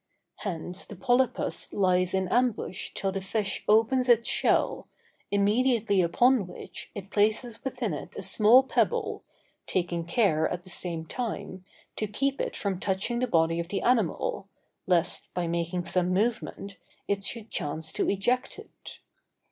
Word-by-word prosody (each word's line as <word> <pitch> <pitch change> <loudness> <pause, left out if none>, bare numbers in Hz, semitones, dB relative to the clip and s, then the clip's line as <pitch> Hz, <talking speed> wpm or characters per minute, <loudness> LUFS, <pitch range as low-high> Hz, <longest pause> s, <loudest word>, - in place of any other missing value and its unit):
Hence 180 -1 -4
the 205 - -9
polypus 245 +4 0
lies 185 -1 +2
in 190 -1 0
ambush 240 -6 0
till 195 - -1
the 195 0 -3
fish 200 +1 -2
opens 230 +4 +3
its 235 -1 +5
shell, - - +2 0.4
immediately 210 0 +2
upon 230 +5 +3
which, 180 - -8
it 200 0 -8
places 220 +3 +1
within 245 -7 -2
it 145 - -6
a - - -5
small 225 +7 +6
pebble, 265 - 0 0.4
taking 175 -2 -1
care, 175 -7 +2
at 180 0 -4
the 185 - -11
same 170 -2 -4
time, 190 -3 -5 0.3
to 215 - -1
keep 275 +7 -1
it - - -3
from 195 -3 -2
touching 200 +6 -1
the 255 - +1
body 165 -4 +2
of 170 - -3
the 195 +2 -3
animal, 255 - +1 0.4
lest, 175 -2 +1
by 180 -1 0
making 170 +1 -2
some 180 -1 +1
movement, 200 -1 -1 0.3
it 200 -1 -1
should 225 +1 -5
chance 160 +2 -3
to - - 0
eject 240 +6 0
it. - - -12
200 Hz, 150 wpm, -28 LUFS, 180-235 Hz, 0.4 s, small